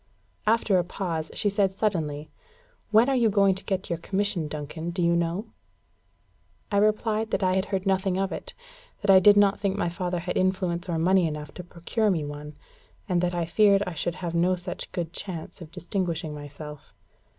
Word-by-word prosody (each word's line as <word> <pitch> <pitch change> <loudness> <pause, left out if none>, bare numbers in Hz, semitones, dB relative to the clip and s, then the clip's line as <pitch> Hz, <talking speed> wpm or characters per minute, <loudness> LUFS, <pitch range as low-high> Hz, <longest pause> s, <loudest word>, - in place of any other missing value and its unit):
After 215 -4 +3
a - - +1
pause, 170 -3 -3
she - - +1
said 200 -1 +2
suddenly: 160 -8 -2 0.6
"When 220 +3 +5
are 275 - +2
you 235 -3 +4
going 200 -1 +4
to 190 - -7
get 190 -1 -2
your 170 - -1
commission, 195 -2 -1
Duncan, 155 +2 -5
do 175 +2 -5
you 170 0 +3
know?" 170 +6 -1 1.2
I 200 - +2
replied 215 +1 +2
that 200 - -1
I 185 0 +3
had 190 +1 +1
heard 195 -1 -2
nothing 190 -1 +1
of 195 0 0
it; - - -6 0.5
that 200 - +4
I 190 - +9
did 205 +2 +7
not 200 -1 +4
think 200 -1 -1
my 175 - 0
father 180 +1 -2
had 180 +1 -3
influence 185 -1 0
or 165 - 0
money 180 +1 +3
enough 150 -1 -6
to 180 - -8
procure 175 +6 -1
me 165 -6 0
one, 145 0 -8 0.5
and 180 -3 +1
that 180 0 0
I 170 -1 0
feared 200 +4 +4
I 180 - -4
should 165 +2 -2
have 175 -2 -4
no 175 +2 +3
such 180 0 -5
good 170 -1 -4
chance 180 -3 -6
of 165 - -9
distinguishing 170 -2 -3
myself. 150 0 -10
180 Hz, 195 wpm, -26 LUFS, 165-200 Hz, 1.2 s, I